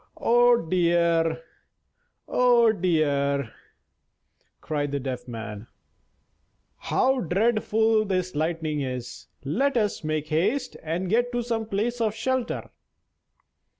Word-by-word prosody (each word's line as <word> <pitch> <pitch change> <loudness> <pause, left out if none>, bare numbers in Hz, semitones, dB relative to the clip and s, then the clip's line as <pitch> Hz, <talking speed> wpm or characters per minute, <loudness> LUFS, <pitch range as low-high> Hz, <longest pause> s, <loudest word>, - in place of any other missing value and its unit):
"Oh 240 0 +4
dear! 170 -2 +1 0.8
oh 240 -2 +4
dear!" 140 - 0 1.1
cried 145 -2 -3
the 140 - -1
Deaf 130 -2 -5
Man, 115 -2 -7 1.1
"how 265 0 +1
dreadful 220 +2 +2
this 185 -2 -1
lightning 155 -1 -1
is! 125 -2 -6 0.2
Let 260 - +1
us 210 -6 0
make 155 0 -2
haste 215 - 0
and 165 +4 -3
get 240 +5 +1
to 240 0 -1
some 225 -2 -2
place 230 +4 -2
of 220 -2 0
shelter." 250 +1 -2
180 Hz, 105 wpm, -25 LUFS, 155-230 Hz, 1.1 s, Oh